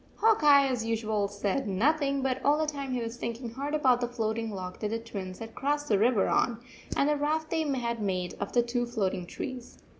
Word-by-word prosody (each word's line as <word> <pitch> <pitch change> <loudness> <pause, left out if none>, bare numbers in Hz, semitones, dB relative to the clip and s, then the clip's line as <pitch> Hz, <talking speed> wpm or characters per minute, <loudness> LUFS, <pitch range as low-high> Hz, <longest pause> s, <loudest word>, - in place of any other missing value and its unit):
Hawk 435 -5 +3
Eye, 280 -2 +7
as 250 -4 -1
usual, 220 -2 0
said 205 +5 -2
nothing, 275 +7 +1
but 260 -1 -1
all 290 +1 +4
the 310 - +1
time 280 -3 -4
he 250 -1 -1
was 230 +1 -5
thinking 235 0 -4
hard 280 +5 -3
about 255 -5 +3
the 245 - +1
floating 225 -1 -2
log 185 -3 -6
that 215 - -1
the 225 - -1
Twins 195 -5 -6
had 225 0 -8
crossed 290 +2 -1
the 205 -3 +3
river 225 -2 +3
on, 235 -2 +1 0.4
and 280 - +3
the 300 - +3
raft 310 +2 -1
they 325 -1 +1
had 235 -3 -2
made 185 -3 -1
of 200 - -3
the 240 - +3
two 240 0 -1
floating 195 -6 -2
trees. 255 +4 -7
240 Hz, 220 wpm, -29 LUFS, 220-280 Hz, 0.4 s, Eye